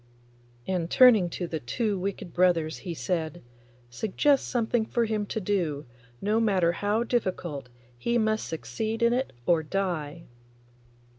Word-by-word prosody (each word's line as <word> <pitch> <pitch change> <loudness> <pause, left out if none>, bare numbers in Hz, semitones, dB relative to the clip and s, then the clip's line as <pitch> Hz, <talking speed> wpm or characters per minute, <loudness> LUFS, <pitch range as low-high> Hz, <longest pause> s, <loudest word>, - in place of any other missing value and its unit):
And 180 -3 -1
turning 225 -8 +6
to 175 - -4
the 165 -2 -4
two 205 - -1
wicked 185 -2 -4
brothers 170 -3 +2
he 175 -3 -5
said, 170 -1 -3 0.5
'Suggest 220 - +1
something 235 -1 +1
for 235 +1 0
him 215 -2 -2
to 220 - -2
do; 175 -8 -1 0.3
no 210 +2 +1
matter 190 -6 +3
how 205 +6 0
difficult, 180 - -2 0.3
he 235 - +1
must 220 -1 0
succeed 220 +7 -3
in 235 0 +4
it 260 +2 -1
or 170 -2 +3
die. 170 -2 -3
190 Hz, 140 wpm, -27 LUFS, 170-220 Hz, 0.5 s, turning